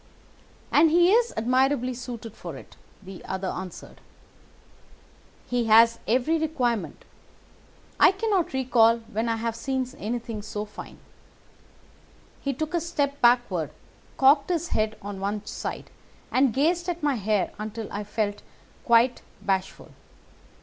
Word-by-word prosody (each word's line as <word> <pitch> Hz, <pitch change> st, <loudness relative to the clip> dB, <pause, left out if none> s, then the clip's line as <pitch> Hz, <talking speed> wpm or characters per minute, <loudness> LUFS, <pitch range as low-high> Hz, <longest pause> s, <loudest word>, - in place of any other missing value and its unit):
"'And 315 Hz, +2 st, +6 dB
he 345 Hz, +3 st, +5 dB
is 470 Hz, +2 st, +3 dB
admirably 255 Hz, +2 st, +1 dB
suited 235 Hz, -3 st, -7 dB
for -, -, -8 dB
it,' -, -, -14 dB, 0.3 s
the 190 Hz, -1 st, -10 dB
other 190 Hz, 0 st, -3 dB
answered. 185 Hz, -1 st, -8 dB, 1.5 s
'He 245 Hz, -1 st, 0 dB
has 230 Hz, +1 st, +6 dB
every 260 Hz, +8 st, +2 dB
requirement. 250 Hz, -9 st, -2 dB, 0.9 s
I -, -, +7 dB
cannot 390 Hz, -3 st, 0 dB
recall 240 Hz, -3 st, +4 dB
when 225 Hz, +3 st, -1 dB
I 230 Hz, -, +1 dB
have 225 Hz, 0 st, -3 dB
seen 260 Hz, +2 st, -2 dB
anything 230 Hz, 0 st, -4 dB
so 210 Hz, 0 st, -5 dB
fine.' 210 Hz, -, -11 dB, 1.4 s
He 275 Hz, -, -1 dB
took 310 Hz, +5 st, -4 dB
a 345 Hz, -, +1 dB
step 290 Hz, -4 st, -2 dB
backward, 240 Hz, -9 st, +3 dB, 0.5 s
cocked 280 Hz, +3 st, +5 dB
his 340 Hz, -1 st, -1 dB
head 215 Hz, 0 st, -1 dB
on 200 Hz, -1 st, -6 dB
one 205 Hz, +2 st, -3 dB
side, -, -, -6 dB, 0.4 s
and 260 Hz, -1 st, +3 dB
gazed 335 Hz, +7 st, +1 dB
at 345 Hz, -2 st, -4 dB
my 290 Hz, -1 st, +2 dB
hair 210 Hz, -4 st, 0 dB
until 215 Hz, 0 st, -5 dB
I 205 Hz, -, -3 dB
felt 205 Hz, 0 st, -2 dB, 0.4 s
quite 235 Hz, +1 st, +3 dB, 0.2 s
bashful. 190 Hz, -1 st, -2 dB
240 Hz, 130 wpm, -26 LUFS, 215-285 Hz, 1.5 s, I